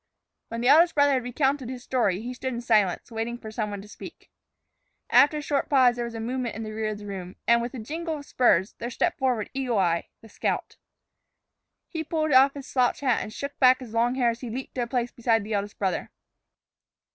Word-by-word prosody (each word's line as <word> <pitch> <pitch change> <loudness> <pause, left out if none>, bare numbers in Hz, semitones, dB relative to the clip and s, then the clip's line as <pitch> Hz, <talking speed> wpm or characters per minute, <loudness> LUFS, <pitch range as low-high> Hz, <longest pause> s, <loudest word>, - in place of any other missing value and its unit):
When 230 +1 -5
the 245 - +1
eldest 335 +5 +6
brother 285 -1 +4
had 260 - +1
recounted 265 +1 -1
his 255 -1 -7
story, 205 -7 0
he 245 +2 -5
stood 255 0 -4
in 235 - -4
silence, 210 -3 +1
waiting 230 +1 -3
for 220 -2 -9
some 215 -1 -2
one 200 -1 -6
to - - -13
speak. - - -12 0.8
After 300 +1 +6
a - - -3
short 285 -1 -1
pause 255 -4 +5
there 240 -1 -3
was 235 -1 -7
a - - -4
movement 240 0 -3
in 220 - -5
the 215 - -6
rear 215 0 -2
of 210 - -4
the 205 - -10
room, 190 -2 -7
and, 235 0 +5
with 240 +3 -5
a - - -5
jingle 320 +7 -4
of 285 - -10
spurs, 205 -8 +2
there 235 - -4
stepped 330 +8 -1
forward 250 -6 0
Eagle 260 -4 -1
Eye, 170 -3 +1
the 225 - -14
scout. 210 - -3 1.1
He 320 -2 -4
pulled 310 -1 -1
off 270 +2 +6
his 280 -2 -7
slouch 255 -1 +1
hat 255 -4 +2
and 215 - -6
shook 280 +5 -6
back 255 -1 +6
his 245 -4 -10
long 235 +2 +2
hair 245 -3 +2
as 230 - -9
he 245 - -5
leaped 255 +4 -6
to 255 - -2
a 240 - -1
place 245 -1 -1
beside 225 -2 +1
the 215 +1 -5
eldest 205 0 -3
brother. 190 -2 -2
240 Hz, 235 wpm, -26 LUFS, 220-265 Hz, 1.1 s, eldest